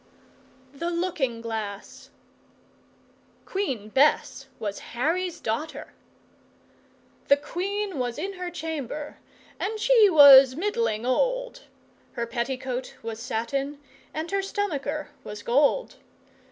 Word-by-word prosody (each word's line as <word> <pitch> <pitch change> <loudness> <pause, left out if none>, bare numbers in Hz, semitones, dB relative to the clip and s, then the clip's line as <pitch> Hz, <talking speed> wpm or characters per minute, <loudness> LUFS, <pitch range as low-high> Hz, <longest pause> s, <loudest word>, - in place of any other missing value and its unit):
The 335 +5 -3
Looking 330 -9 -1
Glass 220 -3 -6 1.4
Queen 265 - -3
Bess 275 +7 +2
Was 205 -2 -4 0.2
Harry's 345 +6 0
daughter! 230 +9 -4 1.3
The 280 - +6
Queen 385 +2 -3
was 245 -1 -2
in 385 +6 -3
her 360 -1 -5
chamber, 305 -4 -5 0.4
and 430 +3 -2
she 455 -2 +6
was 275 -5 +9
middling 400 - -1
old, - - 0 0.5
Her 235 -2 -2
petticoat 255 +2 -4
was 225 -1 -5
satin 270 +4 -2 0.3
and 320 +3 -5
her 395 0 +1
stomacher 310 -7 -3
was 210 0 -8
gold. 285 - +2
290 Hz, 100 wpm, -26 LUFS, 245-370 Hz, 1.4 s, was